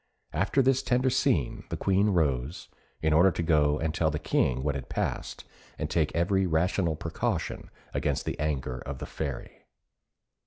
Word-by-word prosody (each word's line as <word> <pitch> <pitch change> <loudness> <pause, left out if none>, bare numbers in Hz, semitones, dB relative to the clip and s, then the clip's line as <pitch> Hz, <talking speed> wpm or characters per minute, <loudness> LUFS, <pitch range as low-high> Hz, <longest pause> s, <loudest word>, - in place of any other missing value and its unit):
After 95 - +2
this 130 0 +3
tender 125 +1 +2
scene 125 - +1
the - - -3
Queen 100 +2 +2
rose, 75 -5 0 0.3
in 80 -1 +3
order 90 +5 +6
to 85 - -2
go 75 -3 +3
and 80 0 -1
tell 80 -2 +2
the 75 - -2
King 65 -3 +1
what 70 -1 +1
had 65 -2 -6
passed, - - -3 0.3
and - - -3
take 80 -3 +1
every 95 +3 +2
rational 85 0 +1
precaution 80 +1 -3 0.2
against - - -1
the - - -3
anger 65 -5 -2
of 70 +2 -6
the - - -6
Fairy. 70 -6 -6
80 Hz, 165 wpm, -28 LUFS, 75-95 Hz, 0.3 s, order